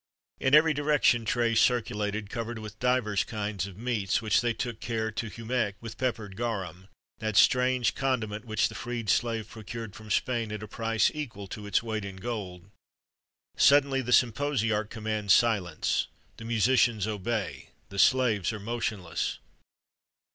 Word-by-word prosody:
[XXXV - - -12
71] - - +4
In 140 +3 +8
every 160 0 +4
direction 145 -5 +2
trays 115 0 +2
circulated, 105 -4 0
covered 115 -1 -4
with 110 -1 -9
divers 125 -5 +1
kinds 105 -3 -3
of 95 -2 -11
meats,[XXXV 110 -4 -1
72] 120 - +1
which 110 -1 +3
they 120 -1 +1
took 115 0 -4
care 110 -1 -2
to 115 - -4
humect 115 -3 -2
with 115 0 -9
peppered 115 -6 -2
garum,[XXXV 110 -5 -3 0.4
73] 110 - -3
that 110 -2 0
strange 125 0 +4
condiment, 115 -5 -2
which 110 -2 +1
the - - -10
freed 120 -4 -2
slave 115 -2 0
procured 115 -1 -8
from 110 -1 -11
Spain 115 0 0
at 105 0 -5
a - - -7
price 115 +1 +1
equal 120 -10 -6
to 105 +1 -8
its 105 +3 +1
weight 110 -2 -3
in 100 -1 -6
gold. 95 -3 -6 0.8
Suddenly 140 -1 +5
the 125 -1 -4
symposiarch 115 -4 +2
commands 110 -3 +1
silence: 100 -9 +1 0.3
the 115 - -9
musicians 115 -2 +3
obey 110 0 -3 0.2
the 100 - -5
slaves 115 -4 +3
are 110 - -6
motionless. 105 -5 -3
110 Hz, 160 wpm, -28 LUFS, 105-120 Hz, 0.8 s, In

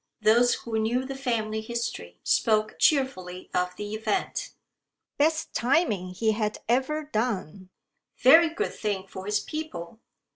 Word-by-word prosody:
Those 235 +3 +4
who 225 -1 -3
knew 240 +4 0
the 270 - -5
family 225 -5 -2
history 225 - -4
spoke 215 -1 +2
cheerfully 185 - +1
of 180 0 0
the 205 +2 -6
event. 215 -1 -2 0.7
"Best 315 +2 +1
timing 235 - +1
he 220 +3 +2
had 215 -1 -1
ever 265 +6 +1
done. 205 - -3 0.5
Very 320 +6 +7
good 330 - -3
thing 200 -3 -2
for 190 0 -9
his 210 0 +2
people. 225 - -6
220 Hz, 135 wpm, -27 LUFS, 205-260 Hz, 0.7 s, Very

